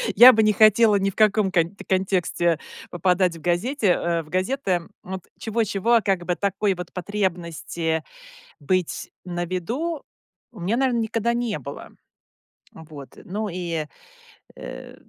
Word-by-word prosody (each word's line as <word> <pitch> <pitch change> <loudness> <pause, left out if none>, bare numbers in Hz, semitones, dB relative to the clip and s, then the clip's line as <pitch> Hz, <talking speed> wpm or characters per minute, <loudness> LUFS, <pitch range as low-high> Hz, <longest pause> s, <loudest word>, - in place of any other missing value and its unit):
я 245 +5 +10
бы 220 0 +3
не 215 0 +4
хотела 215 +1 +5
ни 195 0 +1
в - - -10
каком 215 -2 +3
кон 175 +1 +1
контексте 180 -3 +1 0.3
попадать 180 0 +1
в - - -14
газете, 205 - 0
э, 170 -1 +1
в 155 - -18
газеты. 185 -2 -1 0.2
Вот 190 0 -6 0.2
чего-чего, 220 0 0
а 230 - +5
как 190 -4 0
бы 180 - 0
такой 200 0 0
вот 180 -1 -7
потребности 170 -4 -2 0.6
быть 180 +4 -1
на 175 -1 -3
виду 245 - -3 0.5
у 215 - -13
меня, 200 +7 0
наверно, 255 -3 +1
никогда 230 +1 0
не 235 -8 -2
было. 140 +2 -8 0.8
Вот. 155 -4 -12
Ну 210 +3 -3
и 170 -3 -3 0.7
э. - - -9
190 Hz, 145 wpm, -23 LUFS, 175-215 Hz, 0.8 s, я